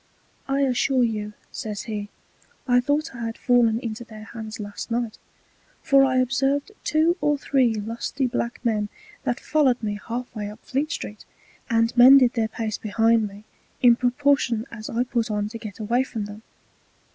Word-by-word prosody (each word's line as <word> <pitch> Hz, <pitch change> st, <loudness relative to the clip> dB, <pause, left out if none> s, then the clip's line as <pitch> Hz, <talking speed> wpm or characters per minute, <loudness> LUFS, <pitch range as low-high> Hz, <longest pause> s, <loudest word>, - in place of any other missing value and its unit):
I 275 Hz, +1 st, +1 dB
assure 260 Hz, -1 st, +2 dB
you, 210 Hz, -2 st, -2 dB, 0.2 s
says 210 Hz, -2 st, -5 dB
he, 210 Hz, -2 st, -5 dB, 0.6 s
I 245 Hz, 0 st, +5 dB
thought 285 Hz, +4 st, 0 dB
I 235 Hz, -2 st, -6 dB
had 225 Hz, -, -6 dB
fallen 240 Hz, -3 st, +3 dB
into 230 Hz, -1 st, -5 dB
their 215 Hz, -2 st, -11 dB
Hands 220 Hz, -1 st, -8 dB
last 205 Hz, +2 st, -6 dB
Night; 230 Hz, -1 st, -2 dB, 0.6 s
for 275 Hz, 0 st, +5 dB
I 260 Hz, -1 st, +2 dB
observed 270 Hz, -, +1 dB
two 315 Hz, +4 st, +2 dB
or 295 Hz, 0 st, +2 dB
three 260 Hz, -5 st, +2 dB
lusty 230 Hz, +5 st, -3 dB
black 240 Hz, 0 st, -2 dB
Men 210 Hz, -3 st, +1 dB, 0.4 s
that 245 Hz, -2 st, 0 dB
follow'd 265 Hz, -6 st, +2 dB
me 205 Hz, -1 st, -2 dB
half 245 Hz, +2 st, -5 dB
way 210 Hz, -1 st, -4 dB
up 210 Hz, -, -13 dB
Fleet 285 Hz, +4 st, -1 dB
street, 210 Hz, -, -6 dB, 0.5 s
and 230 Hz, 0 st, +2 dB
mended 255 Hz, 0 st, +8 dB
their 225 Hz, -2 st, +1 dB
pace 220 Hz, -1 st, -4 dB
behind 225 Hz, +1 st, +2 dB
me, 200 Hz, +1 st, -12 dB, 0.4 s
in 240 Hz, -1 st, +8 dB
proportion 250 Hz, -2 st, +1 dB
as 220 Hz, -2 st, -7 dB
I 235 Hz, +2 st, 0 dB
put 240 Hz, -2 st, -1 dB
on 210 Hz, -1 st, -1 dB
to 230 Hz, +1 st, -7 dB
get 215 Hz, -4 st, -8 dB
away 230 Hz, +3 st, +1 dB
from 225 Hz, -5 st, -5 dB
them. 205 Hz, +1 st, -9 dB
235 Hz, 170 wpm, -24 LUFS, 215-260 Hz, 0.6 s, mended